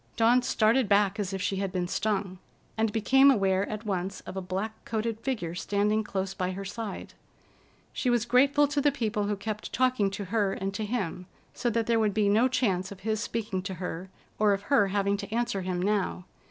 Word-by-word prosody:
Dawn 235 +2 +4
started 230 0 +2
back 200 0 +3
as 200 -2 -2
if 190 -1 -3
she 195 - -1
had 195 -1 -2
been 180 -2 -1
stung, 195 -2 -1 0.4
and 220 -1 +1
became 265 +6 +5
aware 195 -5 +2
at 215 +1 -5
once 190 -1 -3
of - - -9
a 190 - -2
black 190 +4 -3
coated 225 0 -2
figure 220 -10 -3
standing 205 +3 0
close 195 -2 -3
by 185 -1 -2
her 195 +1 -6
side. 205 0 -6 0.8
She 250 - -1
was 240 -2 +2
grateful 275 +4 +4
to 290 0 0
the 290 0 +3
people 215 -6 -1
who 205 0 0
kept 210 +1 -5
talking 255 -5 +2
to 195 +1 -5
her 205 -4 +2
and 195 0 -3
to 215 +1 -3
him, 185 -6 -3 0.3
so 245 - -1
that 230 0 0
there 230 0 +2
would 210 -2 +1
be 210 -2 +3
no 220 +5 +4
chance 195 -8 0
of 195 -1 -10
his 215 +1 -1
speaking 215 -4 -3
to 190 0 -5
her, 180 +1 -5 0.3
or 210 -1 +4
of 200 0 -3
her 205 -7 +5
having 200 0 +1
to 200 0 -7
answer 235 -3 -1
him 180 -1 -2
now. 195 -2 -1
205 Hz, 210 wpm, -28 LUFS, 195-230 Hz, 0.8 s, became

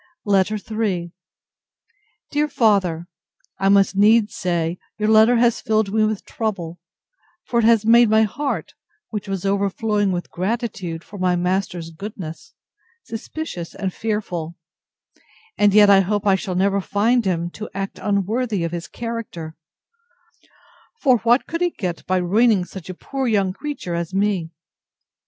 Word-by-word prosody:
LETTER 205 +1 +2
III 200 -5 -2 1.2
DEAR 295 +1 +1
FATHER, 190 - +1 0.5
I 195 0 +2
must 200 0 +4
needs 215 +2 +4
say, 170 -1 -1 0.2
your 215 0 0
letter 220 +2 +6
has 235 -1 +2
filled 215 -2 0
me 220 0 +3
with 215 -2 -2
trouble, 180 -7 -4 0.7
for 235 - 0
it 225 - +2
has 225 -2 +4
made 235 0 +6
my 220 +1 +5
heart, 275 +7 -3 0.4
which 210 -2 -4
was 195 -1 -3
overflowing 200 +1 0
with 175 -1 -4
gratitude 195 -4 -3
for 205 - -11
my 180 -1 +2
master's 180 -2 -2
goodness, 185 - -8 0.5
suspicious 225 - -6
and 190 -2 -3
fearful: 180 -7 -3 1.0
and 205 0 +4
yet 210 +1 +7
I 195 - +7
hope 205 +2 0
I 200 - +5
shall 190 -1 -2
never 195 +2 +2
find 230 +6 +1
him 175 -3 -1
to 215 - -7
act 195 0 -4
unworthy 205 0 0
of 170 - -2
his 170 -1 -5
character; 230 -9 -6 1.4
for 255 - +4
what 240 +3 +3
could 335 +1 -4
he 355 - +3
get 180 - -5
by 185 - +2
ruining 200 +2 +3
such 185 -1 -10
a 185 - -5
poor 270 +6 -3
young 200 -4 +1
creature 280 -8 -5
as 170 +2 -3
me? 195 -4 0
200 Hz, 145 wpm, -21 LUFS, 180-220 Hz, 1.4 s, yet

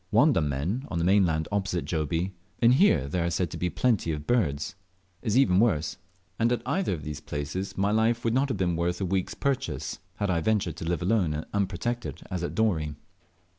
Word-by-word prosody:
Wandammen, 100 - +2
on 85 - -3
the 85 - +1
mainland 90 -5 +3
opposite 95 -3 -1
Jobie, 80 +3 -1 0.3
inhere 120 - +5
there 85 +4 -1
are 85 - +1
said 85 -1 -1
to - - -5
be 90 +2 0
plenty 110 -6 +1
of 75 -1 -4
birds, 80 -12 0 0.5
is 110 -1 +1
even 95 -9 +5
worse, 100 -9 +1 0.4
and 115 +1 +3
at 120 -2 0
either 175 - 0
of 75 - -9
these 75 0 -5
places 85 +7 -4
my 100 +1 +2
life 115 +2 +2
would 115 - +2
not 135 +3 +2
have 125 - -1
been 90 -2 +1
worth 85 +1 -1
a 95 - -1
week's 95 0 -1
purchase 135 -1 -2 0.2
had 100 -2 -1
I 85 -2 +1
ventured 95 -4 0
to - - -5
live 85 0 -1
alone 90 -6 +2
and 75 - -4
unprotected 95 - -2
as 90 -1 -2
at 85 - -3
Dorey. 80 -9 +1
95 Hz, 200 wpm, -27 LUFS, 80-115 Hz, 0.5 s, inhere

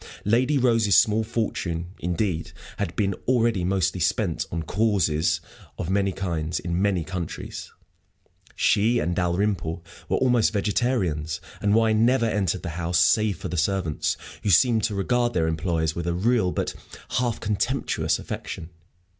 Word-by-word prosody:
Lady 125 +7 +3
Rose's 115 -6 +3
small 110 +1 +4
fortune, 90 -6 -3
indeed, 90 -1 -2 0.2
had 85 - -3
been 100 -2 +1
already 115 -6 +2
mostly 90 -1 0
spent 80 -2 0
on 85 -1 -2
"causes" 90 -6 +1 0.4
of 90 +1 -3
many 100 0 +2
kinds, 85 -4 -2
in 85 +1 -2
many 95 -4 +1
countries. 85 0 -6 0.8
She 115 +4 +3
and 85 -6 0
Dalrymple 90 -2 -1 0.3
were - - +2
almost 125 -4 +3
vegetarians, 100 - 0 0.2
and 105 0 +2
wine 110 -1 +3
never 125 0 +3
entered 95 -5 0
the 85 - -3
house 85 +1 0
save 100 +4 +3
for - - -5
the 90 - -4
servants, 85 -1 0 0.2
who 105 - -1
seemed 110 +4 +4
to 105 -3 -2
regard 120 +4 0
their 80 -2 +2
employers 80 -1 0
with 85 0 -3
a 85 - 0
real 110 0 +2
but - - -2 0.5
half 120 -3 -1
contemptuous 115 +6 0
affection. 80 +1 -6
95 Hz, 145 wpm, -25 LUFS, 85-110 Hz, 0.8 s, small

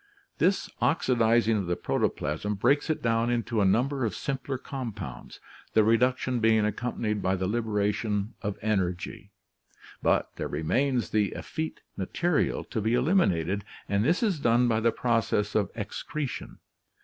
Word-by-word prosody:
This 190 +4 +2
oxidizing 115 -6 +3
of 95 -4 -2
the 90 - 0
protoplasm 85 +8 -1
breaks 145 +10 +2
it 155 - -1
down 115 0 +2
into 120 -2 0
a - - +4
number 130 +7 +2
of 110 -6 -1
simpler 135 0 -3
compounds, 130 -4 -7 0.3
the 110 - +5
reduction 125 +3 +2
being 110 -1 +4
accompanied 105 -1 -2
by 95 0 +1
the 95 0 -2
liberation 105 0 -1
of 105 -1 -3
energy; 95 -5 -2 0.7
but - - +2
there - - -2
remains 120 - 0
the 105 -2 +1
effete 160 0 -5
material 160 - 0
to 110 - -3
be 110 +3 +2
eliminated 105 - +2 0.2
and 100 +1 +1
this 165 - +2
is 195 -8 +1
done 120 -1 +3
by 110 -2 +2
the 115 +1 +3
process 115 -4 0
of 100 -3 +1
excretion. 125 +6 -5
115 Hz, 145 wpm, -28 LUFS, 105-130 Hz, 0.7 s, the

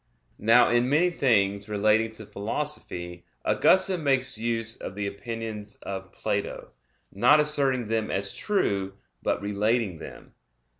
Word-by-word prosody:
Now 115 +3 +5
in 120 +1 +2
many 170 +5 +3
things 100 - +1
relating 110 +2 +2
to 110 -1 -9
Philosophy 100 -7 -4 0.2
Augustine 185 -2 +3
makes 135 -2 +2
use 115 0 -2
of 95 - -8
the 105 0 -3
opinions 105 0 -6
of 95 -1 -6
Plato, - - -3 0.4
not 145 +10 +5
asserting 140 -5 +1
them 110 -1 -1
as 100 0 -2
true, 100 - -1 0.3
but - - -1
relating 105 -2 0
them. - - -11
110 Hz, 130 wpm, -26 LUFS, 100-130 Hz, 0.4 s, Now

